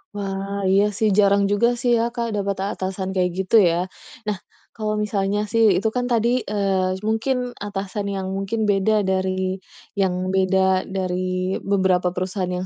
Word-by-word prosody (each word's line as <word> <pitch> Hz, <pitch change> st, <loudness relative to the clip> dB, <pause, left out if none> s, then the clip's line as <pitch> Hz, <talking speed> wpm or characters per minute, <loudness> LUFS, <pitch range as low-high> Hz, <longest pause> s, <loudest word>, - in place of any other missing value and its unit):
Wah, 195 Hz, 0 st, -3 dB
iya 195 Hz, +1 st, +4 dB
sih. 220 Hz, -, +2 dB
Jarang 200 Hz, 0 st, +4 dB
juga 205 Hz, +3 st, +3 dB
sih, 245 Hz, -, +1 dB
ya 230 Hz, -, +1 dB
Kak, 235 Hz, -1 st, -1 dB
dapat 200 Hz, -1 st, -1 dB, 0.2 s
atasan 190 Hz, 0 st, -3 dB
kayak 180 Hz, -1 st, +1 dB
gitu, 190 Hz, +4 st, 0 dB
ya. 175 Hz, +2 st, -1 dB, 0.4 s
Nah, 205 Hz, -, -1 dB, 0.4 s
kalau 215 Hz, -1 st, -2 dB
misalnya 200 Hz, 0 st, 0 dB
sih, 230 Hz, -1 st, +3 dB, 0.2 s
itu 220 Hz, -, +1 dB
kan 245 Hz, 0 st, 0 dB
tadi, 235 Hz, 0 st, +2 dB, 0.2 s
eee, 195 Hz, -2 st, 0 dB
mungkin 225 Hz, +4 st, +1 dB, 0.2 s
atasan 200 Hz, 0 st, -4 dB
yang 190 Hz, -1 st, -3 dB
mungkin 195 Hz, +3 st, -2 dB
beda 205 Hz, +2 st, +3 dB
dari 190 Hz, 0 st, 0 dB, 0.4 s
yang 190 Hz, -2 st, +2 dB, 0.2 s
beda 190 Hz, 0 st, +2 dB
dari 185 Hz, 0 st, -2 dB
beberapa 190 Hz, -2 st, +2 dB
perusahaan 185 Hz, 0 st, -2 dB
yang 185 Hz, -, -3 dB
195 Hz, 155 wpm, -22 LUFS, 185-205 Hz, 0.4 s, iya